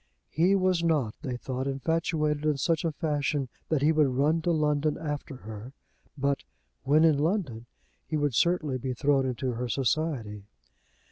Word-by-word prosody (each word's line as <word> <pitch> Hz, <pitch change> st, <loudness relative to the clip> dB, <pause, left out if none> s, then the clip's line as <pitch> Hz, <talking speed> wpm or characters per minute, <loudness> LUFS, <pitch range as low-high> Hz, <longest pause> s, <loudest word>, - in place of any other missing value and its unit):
He 180 Hz, +5 st, +3 dB
was 185 Hz, -3 st, +2 dB
not, 150 Hz, -10 st, +1 dB
they 130 Hz, -5 st, -3 dB
thought, 130 Hz, +1 st, -4 dB
infatuated 150 Hz, +1 st, 0 dB
in 150 Hz, -2 st, +1 dB
such 165 Hz, +3 st, +1 dB
a 165 Hz, -, 0 dB
fashion 145 Hz, -3 st, -1 dB, 0.2 s
that 150 Hz, -3 st, +1 dB
he 155 Hz, -, +5 dB
would 155 Hz, -2 st, +4 dB
run 145 Hz, +6 st, +1 dB
to 175 Hz, -, -1 dB
London 150 Hz, -1 st, +1 dB
after 150 Hz, -2 st, -4 dB
her; 110 Hz, +2 st, -9 dB, 0.4 s
but, 140 Hz, 0 st, 0 dB, 0.4 s
when 150 Hz, +3 st, +4 dB
in 155 Hz, -3 st, +4 dB
London, 150 Hz, -, -1 dB, 0.4 s
he 155 Hz, -, -1 dB
would 145 Hz, -3 st, 0 dB
certainly 155 Hz, -2 st, +1 dB
be 130 Hz, 0 st, -3 dB
thrown 135 Hz, 0 st, +2 dB
into 125 Hz, +1 st, -2 dB
her 120 Hz, +1 st, -3 dB
society. 130 Hz, -7 st, -1 dB
145 Hz, 160 wpm, -28 LUFS, 130-160 Hz, 0.4 s, he